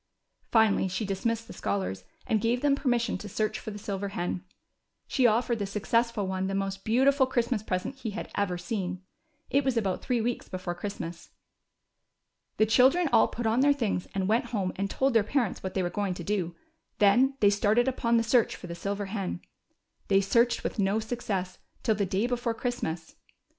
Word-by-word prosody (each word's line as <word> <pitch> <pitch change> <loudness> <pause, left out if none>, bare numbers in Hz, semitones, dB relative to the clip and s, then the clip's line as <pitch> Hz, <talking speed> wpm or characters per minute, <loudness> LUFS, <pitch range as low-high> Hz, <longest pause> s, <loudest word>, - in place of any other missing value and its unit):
Finally 220 -4 +4
she 185 +4 -2
dismissed 225 +4 -1
the - - -10
scholars, 95 - -3 0.2
and 215 -2 +1
gave 235 +2 +1
them 290 -1 +4
permission 245 -7 0
to 205 - -7
search 215 +2 -1
for - - -7
the 205 - -6
silver 200 -1 -3
hen. 180 -2 -3 0.6
She 255 -3 +3
offered 235 +1 +1
the 200 - -2
successful 230 +2 0
one 190 0 -2
the 195 - -2
most 195 0 -2
beautiful 265 +4 +3
Christmas 240 -3 0
present 185 +3 -2
he 245 -4 -4
had 210 +2 -6
ever 195 -3 0
seen. 185 0 -4 0.5
It 280 +1 +3
was 260 -3 0
about 195 -5 0
three 250 -2 0
weeks 235 +2 -2
before 185 -1 -4
Christmas. 175 -3 -6 1.3
The 215 - +5
children 265 +9 +4
all - - +6
put 240 - -5
on 225 +2 +2
their 285 +2 +5
things, 225 -9 -1
and 190 -1 0
went 225 +4 +2
home 195 -5 -2
and 195 +1 -2
told 265 +4 +1
their 225 - +5
parents 235 -1 -1
what 190 - -5
they 190 - +1
Avere 175 0 -3
going 200 -2 -1
to 175 - -6
do; 180 -3 -1 0.4
then 245 +6 +4
they 205 -1 +5
started 210 +4 +2
upon 235 -2 +2
the 230 - +3
search 230 0 +3
for - - -10
the 170 - -6
sih^er 200 +3 -3
hen. 195 -4 -3 0.7
They 195 -1 +4
searched 235 +5 +2
Avith - - -3
no 200 +2 +2
success 205 -5 -3 0.2
till 220 - +3
the 200 -2 -1
day 190 +5 0
before 245 -1 -1
Christmas. 180 -11 -4
210 Hz, 195 wpm, -28 LUFS, 195-235 Hz, 1.3 s, all